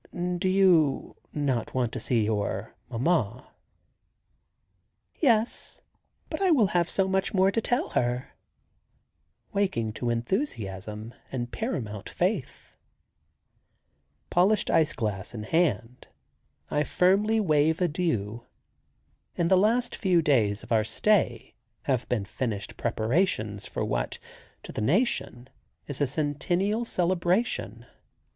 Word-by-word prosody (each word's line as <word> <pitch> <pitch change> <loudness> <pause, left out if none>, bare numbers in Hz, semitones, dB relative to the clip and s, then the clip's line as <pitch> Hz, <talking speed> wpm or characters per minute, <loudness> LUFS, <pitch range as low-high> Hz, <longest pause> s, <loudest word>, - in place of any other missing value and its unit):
"Do 185 +1 +1
you 180 -7 +3 0.2
not 135 -7 -1
want 125 -3 +1
to - - -4
see 115 -4 +1
your 105 0 -2 0.2
mamma?" 125 - 0 1.7
"Yes, 230 -6 +1 0.5
but - - -5
I 380 - +3
will 275 -10 +5
have 175 -1 +2
so 190 -1 +1
much 190 +1 0
more 190 +1 +4
to 225 - 0
tell 245 +3 0
her," 125 +1 -1 1.2
waking 115 - 0
to 120 +1 -3
enthusiasm 110 - -3 0.2
and 120 -2 -3
paramount 115 - -4
faith. - - -2 1.6
Polished 190 +4 +3
ice 160 -3 +3
glass 105 -2 -3
in 105 - -5
hand 125 -4 0 0.6
I 150 - +2
firmly 200 +8 +3
wave 155 -4 +2
adieu. 120 - -1 0.9
In 170 -1 +1
the 190 - +6
last 235 +6 +2
few 180 -4 +2
days 110 -9 +2
of - - -13
our 110 -2 +4
stay 170 - +1 0.3
have 130 -4 -1
been 110 -5 0
finished 105 -1 -4
preparations 110 - 0
for - - -3
what, - - -2 0.5
to - - -8
the - - -4
nation, 135 - 0 0.4
is 145 0 -6
a 145 - +3
centennial 175 - 0
celebration. 185 +3 0
145 Hz, 115 wpm, -27 LUFS, 115-190 Hz, 1.7 s, the